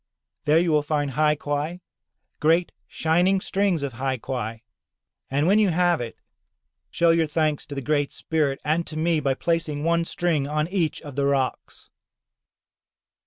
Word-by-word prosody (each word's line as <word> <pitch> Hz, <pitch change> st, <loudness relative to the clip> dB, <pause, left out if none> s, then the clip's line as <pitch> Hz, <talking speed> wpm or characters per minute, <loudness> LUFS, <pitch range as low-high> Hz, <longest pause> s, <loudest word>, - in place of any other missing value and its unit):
There 150 Hz, +1 st, +4 dB
you 170 Hz, 0 st, +2 dB
will 150 Hz, -1 st, +4 dB
find 145 Hz, -1 st, -1 dB
hai 150 Hz, +3 st, +2 dB
quai, 145 Hz, +4 st, -3 dB, 0.6 s
great 165 Hz, +3 st, +2 dB, 0.2 s
shining 175 Hz, +4 st, +2 dB
strings 190 Hz, -5 st, 0 dB
of 140 Hz, -3 st, -3 dB
hai 130 Hz, +2 st, -2 dB
quai. 115 Hz, -2 st, -5 dB, 0.7 s
And 140 Hz, +3 st, +1 dB
when 200 Hz, +5 st, +4 dB
you 210 Hz, -3 st, +4 dB
have 175 Hz, -2 st, +2 dB
it, 115 Hz, -2 st, -6 dB, 0.7 s
show 170 Hz, -1 st, +3 dB
your 165 Hz, -1 st, +2 dB
thanks 155 Hz, -1 st, 0 dB
to 145 Hz, -, -7 dB
the 135 Hz, -, -4 dB
Great 145 Hz, 0 st, 0 dB
Spirit 150 Hz, -4 st, -1 dB
and 160 Hz, +3 st, 0 dB
to 155 Hz, -, -6 dB
me 165 Hz, 0 st, +2 dB
by 135 Hz, -2 st, 0 dB
placing 165 Hz, -2 st, -1 dB
one 170 Hz, +1 st, +2 dB
string 165 Hz, -5 st, 0 dB
on 150 Hz, +1 st, 0 dB
each 180 Hz, -5 st, -1 dB
of 145 Hz, -3 st, -9 dB
the 140 Hz, 0 st, +1 dB
rocks." 135 Hz, -2 st, -2 dB
155 Hz, 165 wpm, -24 LUFS, 140-170 Hz, 0.7 s, There